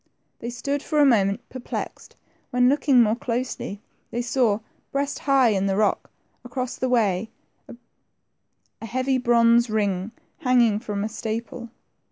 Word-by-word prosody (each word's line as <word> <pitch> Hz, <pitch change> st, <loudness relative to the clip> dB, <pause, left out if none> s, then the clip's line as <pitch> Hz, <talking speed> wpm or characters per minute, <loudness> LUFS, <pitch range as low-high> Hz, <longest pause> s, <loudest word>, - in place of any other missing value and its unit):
They 235 Hz, -, -5 dB
stood 280 Hz, +4 st, -3 dB
for 305 Hz, -1 st, -1 dB
a 290 Hz, -, +6 dB
moment 220 Hz, -2 st, +2 dB
perplexed, 255 Hz, -2 st, -7 dB, 0.3 s
when, 250 Hz, 0 st, +3 dB
looking 275 Hz, -3 st, +4 dB
more 215 Hz, 0 st, +2 dB
closely, 235 Hz, -4 st, -4 dB, 0.3 s
they 240 Hz, +1 st, -3 dB
saw, 235 Hz, -4 st, +1 dB, 0.3 s
breast 280 Hz, +1 st, -2 dB
high 265 Hz, -3 st, +5 dB
in 195 Hz, -2 st, +1 dB
the 195 Hz, -, +1 dB
rock 205 Hz, -1 st, +1 dB, 0.3 s
across 250 Hz, 0 st, -4 dB
the 255 Hz, -, -2 dB
way, 220 Hz, -4 st, +1 dB, 0.4 s
a 235 Hz, -1 st, -18 dB
heavy 260 Hz, +2 st, 0 dB
bronze 235 Hz, -1 st, +4 dB
ring 200 Hz, -2 st, 0 dB, 0.3 s
hanging 240 Hz, -5 st, +3 dB
from 205 Hz, -2 st, -4 dB
a -, -, -1 dB
staple. 230 Hz, +2 st, -5 dB
235 Hz, 140 wpm, -24 LUFS, 215-255 Hz, 0.4 s, a